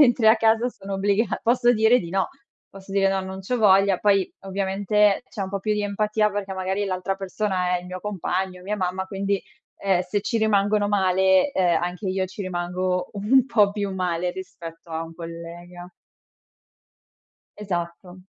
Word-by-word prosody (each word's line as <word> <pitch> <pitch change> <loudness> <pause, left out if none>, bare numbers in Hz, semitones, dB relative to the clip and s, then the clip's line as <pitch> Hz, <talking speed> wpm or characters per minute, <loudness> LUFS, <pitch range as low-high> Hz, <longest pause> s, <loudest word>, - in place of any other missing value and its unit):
mentre 240 -5 +5
a 220 - +7
casa 225 +2 +3
sono 195 -5 -7
obbligata, 200 +2 +1
posso 240 +1 +3
dire 220 +2 +4
di 170 -2 -7
no, 190 0 0 0.4
posso 195 0 -13
dire 195 -1 +3
no, 195 0 0
non 190 0 -7
c'ho 245 +6 -2
voglia, 195 -3 +5
poi 195 -3 +2
ovviamente 195 +2 +1
c'è 200 - -5
un 190 - -4
po' 200 -1 -3
più 215 +1 0
di 210 - -1
empatia 210 +1 +1
perché 200 -1 -4
magari 190 +2 -1
l'altra 185 0 -2
persona 185 -2 -1
è - - -4
il 180 - -12
mio 185 0 -6
compagno, 185 -2 -3
mia 205 +3 -3
mamma, 190 0 -2
quindi, 195 0 -1 0.4
ehm, 190 -2 +2
se 200 +3 -2
ci 230 +2 -1
rimangono 205 -1 +2
male, 190 +3 +3
ehm, 175 -3 +2
anche 180 +3 -4
io 185 0 0
ci 195 +2 -7
rimango 180 0 -2
un 225 +6 +3
po' 210 -6 +4
più 205 -2 -3
male 180 -1 -1
rispetto 170 -3 -10
a 160 0 -3
un 165 0 -11
collega. 175 +1 -9 1.7
Esatto. 180 -2 -5
195 Hz, 175 wpm, -24 LUFS, 180-205 Hz, 1.7 s, a